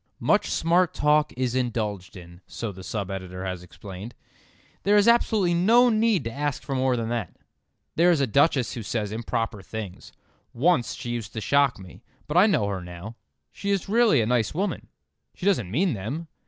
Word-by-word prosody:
"Much - - +2
smart 175 +2 +2
talk 150 0 +3
is 125 -2 -1
indulged 110 -6 -2
in," 85 0 -13
so 115 -3 -5
the 95 -1 -11
sub 100 -1 -4
editor 95 -1 -6
has 90 -2 -4
explained. 95 +4 -10 0.7
There 205 +1 +3
is 205 - +4
absolutely 220 -6 +3
no 230 +8 +5
need 220 - +2
to 115 - -4
ask 145 +1 -3
for 140 - -4
more 130 -1 +1
than 115 -1 -2
that. 115 -7 -3 0.6
There 170 +2 +4
is 170 -4 +3
a 140 - +3
Duchess 135 0 +2
who 120 - -5
says 105 -1 -3
improper 115 -1 -3
things. 100 -1 -8 0.4
Once 135 -1 +1
she 120 - -6
used 120 -3 -5
to 110 - -4
shock 140 +3 +2
me. 95 -2 -13 0.3
But 150 - -4
I 190 +4 +7
know 190 - +2
her 100 -2 -3
now. 90 +5 -9 0.4
She 200 - -5
is 200 -2 0
really 220 - +4
a - - +1
nice 120 +2 0
woman; 195 +4 -2 0.5
she 180 - -7
doesn't 170 - +2
mean 165 - +1
them. 125 - -5
120 Hz, 190 wpm, -25 LUFS, 105-170 Hz, 0.7 s, I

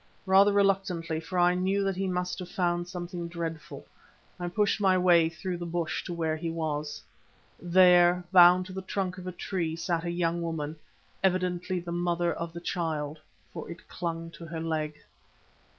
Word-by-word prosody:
Rather 195 +2 +6
reluctantly, 195 -5 +1
for 165 +3 -5
I 175 0 +5
knew 190 +2 +1
that 195 -1 0
he 190 +1 -1
must 180 0 -2
have 180 - -7
found 175 -1 0
something 175 -1 -5
dreadful, 165 -2 -6 0.5
I 175 - -3
pushed 205 +3 +1
my 190 -2 +4
way 175 -3 +5
through 175 +2 -5
the 175 - -5
bush 170 -1 -2
to 175 - -4
where 160 -2 0
he 165 +1 -4
was. 150 -3 -3 0.6
There, 180 0 +5
bound 180 0 +7
to 185 - -9
the 190 - -4
trunk 190 -1 -3
of 180 - -8
a - - -2
tree, 170 -3 -3
sat 165 0 -1
a 175 - -2
young 170 0 0
woman, 160 -2 -3 0.5
evidently 185 -1 0
the 170 0 -7
mother 175 0 0
of 170 0 -5
the 170 - -7
child, 155 -4 -3 0.3
for - - -7
it 170 +2 -10
clung 165 -1 -4
to 165 - -10
her 165 +1 -5
leg. 155 -2 -2
175 Hz, 180 wpm, -28 LUFS, 165-185 Hz, 0.6 s, bound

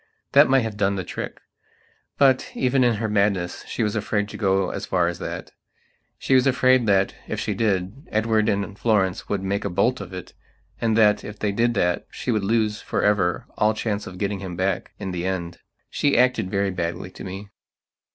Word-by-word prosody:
." - - -49
That 140 0 +7
might 135 0 +5
have 110 -2 -4
done 100 -1 +1
the 95 - -3
trick. - - -6 0.8
But, 135 -2 +4
even 130 0 +2
in 120 -2 +3
her 110 +1 -2
madness, 100 -4 0
she 115 - -2
was 105 -1 -1
afraid 105 -1 -1
to - - -9
go 95 -3 +1
as - - -5
far 90 -2 +2
as 85 -1 -3
that. - - -6 0.7
She - - -1
was 130 +1 +5
afraid 130 -2 +4
that, 95 -1 +3
if - - -3
she 105 - -1
did, 100 - -1
Edward 110 0 +1
and 100 0 -2
Florence 95 -5 +1
would 100 -2 -1
make 100 +1 -1
a 100 - -2
bolt 100 +7 +1
of 95 -2 -8
it, 90 -1 -8 0.5
and 115 -1 +1
that, 105 -2 +4
if 105 0 -8
they 105 -1 -1
did 120 +3 +1
that, 90 -3 0
she - - -3
would 110 -3 0
lose 105 0 +1
forever 100 -4 +1
all 105 0 +3
chance 105 -2 -2
of 90 - -9
getting 100 0 -2
him 95 -2 -6
back 95 +1 -1
in 95 - -5
the 90 0 -3
end. 85 -2 -3 0.3
She 145 - +2
acted 125 -5 +3
very 100 0 0
badly 85 0 -4
to - - -10
me. 95 +2 -7
105 Hz, 205 wpm, -23 LUFS, 95-115 Hz, 0.8 s, That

